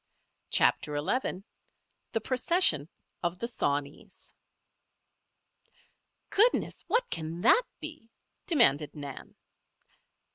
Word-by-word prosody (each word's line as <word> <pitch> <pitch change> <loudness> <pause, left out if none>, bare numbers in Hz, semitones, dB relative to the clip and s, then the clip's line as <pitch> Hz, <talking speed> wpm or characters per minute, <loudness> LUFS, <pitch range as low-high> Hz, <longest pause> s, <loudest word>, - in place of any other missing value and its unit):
CHAPTER 150 -1 +2
XI 190 - -2 0.7
THE 225 - 0
PROCESSION 255 - +2 0.3
OF 175 0 -2
THE 235 - -3
SAWNEYS 145 -10 -4 2.0
"Goodness! 455 +5 +2
what 485 +1 +1
can 165 +2 -5
that 475 - +6 0.2
be?" 310 -7 -9 0.4
demanded 160 - +3
Nan. 140 -3 -9
185 Hz, 80 wpm, -29 LUFS, -, 2.0 s, that